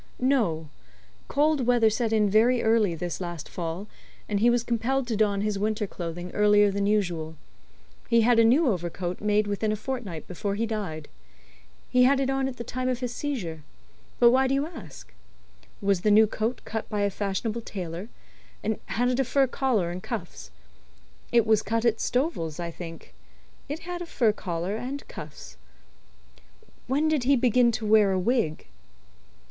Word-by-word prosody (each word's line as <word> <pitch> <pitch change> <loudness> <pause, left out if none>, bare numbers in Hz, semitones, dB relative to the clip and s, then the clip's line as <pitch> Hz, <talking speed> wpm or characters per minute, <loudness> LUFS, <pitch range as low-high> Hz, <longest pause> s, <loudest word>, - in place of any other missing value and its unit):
"No. 220 - +1 0.6
Cold 290 -3 +1
weather 235 -3 +4
set 225 0 -1
in 215 -2 +3
very 230 +4 +3
early 220 -6 +3
this 175 +2 -4
last 175 -4 -5
fall, 170 +2 -5 0.4
and 205 -1 0
he 235 +3 +5
was 240 -1 +2
compelled 245 +3 0
to 235 -2 -2
don 205 -2 +1
his 210 -1 -1
winter 215 +1 0
clothing 175 -1 -6
earlier 205 -1 +4
than 200 0 -1
usual. 175 -7 0 0.7
He 230 0 +5
had 235 +1 +4
a - - +7
new 270 +8 +4
overcoat 175 -3 -2
made 210 0 +2
within 205 +1 -1
a - - 0
fortnight 215 -7 -5
before 200 +3 -3
he 225 +3 0
died. 200 -9 -4 0.8
He 250 - +3
had 265 +2 +5
it 270 0 0
on 270 0 0
at 255 -2 -6
the 235 - -5
time 255 +2 -3
of 250 -2 -1
his 250 -2 -3
seizure. 200 - -4 0.6
But 235 0 +7
why 265 +1 +3
do 270 - +1
you 280 +2 +1
ask?" 165 - -11 0.7
"Was 195 -3 +2
the 210 - +2
new 215 +1 +7
coat 220 +3 -2
cut 220 0 -4
by 210 -1 -1
a 200 0 +1
fashionable 210 +4 -2
tailor, 180 -1 -6 0.5
and 220 0 -1
had 245 +2 0
it 250 +1 0
a - - +4
fur 270 +2 +2
collar 245 -9 0
and 180 +1 -6
cuffs?" 205 - -6 0.8
"It 235 -2 +4
was 220 -1 +3
cut 230 +1 -1
at 230 -1 +2
Stovel's, 235 - -1
I 170 -1 -3
think. 165 - -10 0.6
It 300 +3 -4
had 350 +1 -5
a 350 - -6
fur 235 -9 +2
collar 180 -1 -3
and 260 +4 -6
cuffs." 145 - -10 1.3
"When 285 +5 +1
did 305 -5 +1
he 280 +2 +5
begin 245 -1 +3
to 220 - -3
wear 210 -2 +5
a 185 - +1
wig?" 200 -6 0
220 Hz, 180 wpm, -26 LUFS, 185-250 Hz, 1.3 s, a